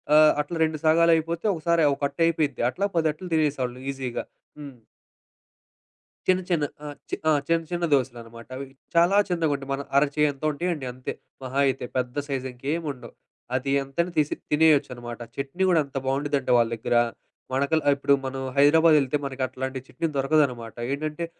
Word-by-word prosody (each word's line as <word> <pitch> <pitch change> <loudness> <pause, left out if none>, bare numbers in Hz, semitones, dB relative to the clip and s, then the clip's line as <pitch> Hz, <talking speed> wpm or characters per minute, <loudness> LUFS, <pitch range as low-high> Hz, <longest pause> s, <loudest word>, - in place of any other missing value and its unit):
ఆహ్, 155 0 +8
అట్లా 165 +3 -5
రెండు 160 -1 0
సగాలు 165 +1 +5
అయిపోతే, 165 +3 -2
ఒకసారి 170 0 +1
ఒకట్టు 140 +4 -3
అయిపోయిద్ది. 155 -5 0
అట్లా 200 +9 -2
పదట్లు 160 +2 0
తినేసేవాళ్ళము 135 -5 0
ఈజీగా. 130 -3 -4 0.4
హ్మ్. 140 -3 -9 1.5
చిన్న 185 0 +3
చిన్న 155 -4 +2 0.2
ఆహ్, 145 -1 -6 0.3
ఆ! - - +5 0.2
చిన్న 165 0 +2
చిన్న 175 0 -2
దోసెలనమాట. 115 -3 -2
అవి 140 - -5 0.3
చాలా 175 +4 +5
చిన్నగా 165 -4 +1
ఉంటాయి. 135 0 -8
మన 140 - -2 0.2
అరచేయంత 145 0 +1
ఉంటాయండి 160 -2 -3
అంతే 130 0 -5 0.3
మహా 130 +2 -2
అయితే. 130 -1 -1
పెద్ద 125 0 -2
సైజు 135 -2 -3
ఇంకేం 145 +7 -3
ఉండవు. 130 -3 -11 0.4
అది 135 +2 -1
ఎంతైనా 170 +6 -2
తీసి 150 -1 +2 0.2
తినేయొచ్చనమాట. 135 -6 +2 0.2
చట్నీ 140 +7 -3
గూడా 170 -3 +4
అంత 140 0 -7
బావుండిద్దంటే 135 -1 0
వాళ్ళ 115 -1 +3
దగ్గర, 115 +1 -1 0.6
మనకల్ 140 +4 +1
ఇప్పుడు 140 0 +2
మనం 135 0 -4
హైదరాబాద్ 155 +3 +6
యెళ్తే 135 +1 0
మనకట్లాంటి 130 0 -3
చట్నీ 165 +6 -2
దొరకదనమాట. 135 -5 +1 0.2
ఏంటంటే 155 +3 -3
140 Hz, 150 wpm, -25 LUFS, 130-160 Hz, 1.5 s, ఆహ్